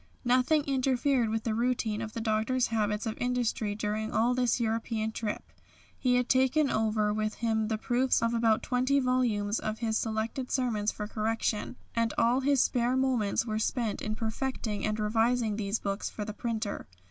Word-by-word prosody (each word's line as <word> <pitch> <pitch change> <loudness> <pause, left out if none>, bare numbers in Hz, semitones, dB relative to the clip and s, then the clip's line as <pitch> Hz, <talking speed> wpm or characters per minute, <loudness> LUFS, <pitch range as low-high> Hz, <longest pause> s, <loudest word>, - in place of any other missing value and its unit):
Nothing 255 +5 +3
interfered 265 -2 +1
with 220 0 -1
the 225 - -1
routine 230 -2 0
of 220 -1 -5
the 230 - -4
Doctor's 225 +3 +1
habits 210 0 0
of 220 -1 -2
industry 245 -4 -1
during 215 +1 -2
all 235 +3 +2
this 250 -1 +1
European 225 -1 -1
trip. 220 -1 -3 0.5
He 250 -1 +1
had 250 0 +2
taken 265 +3 +3
over 215 -1 +1
with 215 0 -1
him 220 -2 0
the 220 0 -1
proofs 245 +2 +1
of 230 0 +1
about 230 -2 +2
20 255 +3 +2
volumes 235 -5 +1
of 215 0 -3
his 220 -2 0
selected 225 +3 -2
sermons 220 -5 0
for 210 - -5
correction, 220 +1 -1 0.2
and 230 -1 +1
all 235 +3 +3
his 275 -1 +3
spare 245 +1 +1
moments 245 -6 +1
were 215 -2 -2
spent 225 -1 -1
in 215 0 -2
perfecting 220 -1 -3
and 215 0 -2
revising 225 +1 +1
these 205 0 -1
books 200 -1 -3
for 210 - -5
the 215 - -5
printer. 220 -2 -3
225 Hz, 175 wpm, -29 LUFS, 215-250 Hz, 0.5 s, Nothing